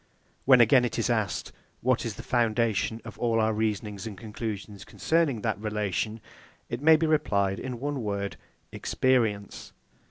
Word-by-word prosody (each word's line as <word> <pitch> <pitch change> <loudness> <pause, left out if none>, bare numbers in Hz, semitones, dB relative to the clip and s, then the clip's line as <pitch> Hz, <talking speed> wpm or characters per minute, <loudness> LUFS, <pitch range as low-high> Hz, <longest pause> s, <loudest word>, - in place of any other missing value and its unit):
When 125 -2 +7
again 125 +2 +6
it 120 -2 -2
is 115 +1 +1
asked, 110 -5 -1 0.3
What 125 -1 +1
is 110 - -5
the - - -9
foundation 115 -2 +1
of - - -10
all 115 -1 +1
our 110 0 +2
reasonings 105 -1 -2
and 105 -3 -7
conclusions 105 -2 -6
concerning 160 -6 0
that 110 -2 -1
relation? 105 +1 -2 0.5
it 120 +2 -4
may 160 +2 +7
be 160 +1 +1
replied 100 -11 +1
in 125 -2 -5
one 145 0 -2
word, 100 -2 -3 0.4
Experience. 115 -6 0
110 Hz, 155 wpm, -27 LUFS, 105-125 Hz, 0.5 s, When